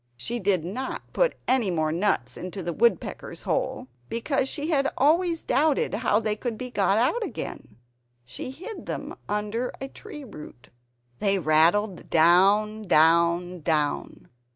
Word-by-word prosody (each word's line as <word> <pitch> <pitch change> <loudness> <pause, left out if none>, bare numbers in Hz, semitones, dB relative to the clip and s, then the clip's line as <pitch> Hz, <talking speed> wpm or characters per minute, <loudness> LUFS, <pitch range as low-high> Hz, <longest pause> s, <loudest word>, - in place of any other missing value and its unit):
She 235 - -4
did 185 -5 +1
not 250 +9 -4
put - - +2
any 255 -6 +2
more 155 -3 0
nuts 165 - 0
into 185 +1 -6
the 170 0 -3
woodpecker's 235 +7 0
hole, 255 - -2 0.2
because 270 +3 -1
she 300 +3 -2
had 275 -2 +2
always 330 +4 +2
doubted 290 -3 +1
how 210 -1 +2
they 215 -1 -1
could 230 0 -4
be 250 +1 -6
got 200 -2 +2
out 280 - +2
again. 105 - -7 0.5
She 125 - -6
hid 370 - -9
them - - -4 0.2
under 210 +4 -2
a 270 - -5
tree 295 +2 -10
root; 150 - -12 0.5
they 200 -1 +2
rattled 175 +5 +2
down, 200 +6 +4
down, 170 +2 +3
down. 150 -2 -1
210 Hz, 145 wpm, -26 LUFS, 170-260 Hz, 0.5 s, down